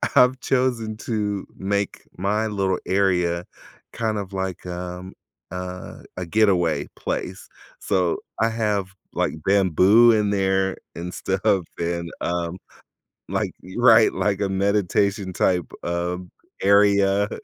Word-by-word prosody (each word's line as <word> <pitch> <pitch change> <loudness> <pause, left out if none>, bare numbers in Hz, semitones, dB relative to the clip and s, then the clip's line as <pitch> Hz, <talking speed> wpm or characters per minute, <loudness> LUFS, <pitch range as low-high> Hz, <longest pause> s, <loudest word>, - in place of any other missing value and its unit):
I've 130 -1 +5
chosen 120 -5 0
to 105 -3 -1
make 100 +1 -2
my 105 +4 0
little 95 -3 0
area 90 -3 +1 0.5
kind 110 -2 -1
of 100 -1 -5
like, 95 -2 -4
um 90 +1 -6 0.4
a 90 0 -7
a 90 - -3
getaway 90 -7 +2
place. - - -4 0.3
So, 90 -3 +1 0.2
I 115 - +3
have 105 -4 -1 0.2
like - - 0
bamboo 100 +4 +5
in 105 -2 +2
there 95 -1 +1 0.2
and 90 +1 -5
stuff 95 -1 0
and, 85 0 -2
um, 85 0 -2 0.7
like - - -1
you 95 +6 -6
Right, 115 -2 +7
like 100 -1 0
a 100 - +1
meditation 100 0 +1
type, 90 -2 +1 0.2
um, 90 +1 -3 0.3
area 100 0 +4
95 Hz, 120 wpm, -23 LUFS, 90-105 Hz, 0.7 s, Right